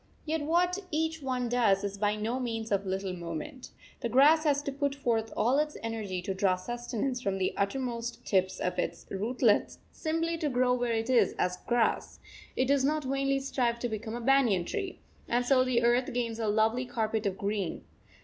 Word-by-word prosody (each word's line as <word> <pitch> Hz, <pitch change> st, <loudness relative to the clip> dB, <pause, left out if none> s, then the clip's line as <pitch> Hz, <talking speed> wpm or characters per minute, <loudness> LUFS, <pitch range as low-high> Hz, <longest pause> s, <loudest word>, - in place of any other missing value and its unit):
Yet 315 Hz, 0 st, -1 dB
what 350 Hz, +5 st, +2 dB
each 320 Hz, +1 st, -1 dB
one 255 Hz, -2 st, -1 dB
does 225 Hz, -5 st, +2 dB
is 200 Hz, 0 st, -4 dB
by 210 Hz, 0 st, +2 dB
no 225 Hz, +4 st, -2 dB
means 225 Hz, -3 st, -3 dB
of 200 Hz, -1 st, 0 dB
little 190 Hz, 0 st, -2 dB
moment. 175 Hz, -, -6 dB, 0.3 s
The 235 Hz, -, -2 dB
grass 300 Hz, +6 st, +5 dB
has 285 Hz, -1 st, +2 dB
to 280 Hz, -, -3 dB
put 280 Hz, 0 st, -1 dB
forth 225 Hz, -5 st, 0 dB
all 255 Hz, +5 st, +3 dB
its 300 Hz, 0 st, -1 dB
energy 210 Hz, -5 st, -3 dB
to 195 Hz, 0 st, -2 dB
draw 190 Hz, -1 st, +2 dB
sustenance 240 Hz, +5 st, -3 dB
from 195 Hz, -4 st, -1 dB
the 185 Hz, -1 st, 0 dB
uttermost 235 Hz, +3 st, -2 dB
tips 190 Hz, -1 st, +1 dB
of 180 Hz, -, -2 dB
its -, -, -3 dB
rootlets 220 Hz, +2 st, +1 dB
simply 330 Hz, +1 st, -2 dB
to 305 Hz, -3 st, 0 dB
grow 250 Hz, -1 st, +2 dB
where 245 Hz, -1 st, 0 dB
it 225 Hz, +2 st, -1 dB
is 250 Hz, -, +4 dB
as 180 Hz, 0 st, 0 dB
grass; 240 Hz, -2 st, +1 dB, 0.4 s
it 255 Hz, -, +2 dB
does 275 Hz, 0 st, +2 dB
not 305 Hz, +2 st, +1 dB
vainly 275 Hz, +1 st, 0 dB
strive 255 Hz, -3 st, 0 dB
to 240 Hz, 0 st, -3 dB
become 220 Hz, +1 st, -4 dB
a 240 Hz, -, -5 dB
banyan 235 Hz, -8 st, +3 dB
tree; 385 Hz, -, -4 dB, 0.3 s
and 245 Hz, +1 st, +1 dB
so 255 Hz, 0 st, +4 dB
the 245 Hz, -2 st, +1 dB
earth 240 Hz, +2 st, +3 dB
gains 235 Hz, -2 st, -2 dB
a 225 Hz, -, -1 dB
lovely 220 Hz, +4 st, +2 dB
carpet 220 Hz, -3 st, -1 dB
of 190 Hz, -1 st, -2 dB
green. 200 Hz, -3 st, -2 dB
240 Hz, 195 wpm, -30 LUFS, 210-275 Hz, 0.4 s, grass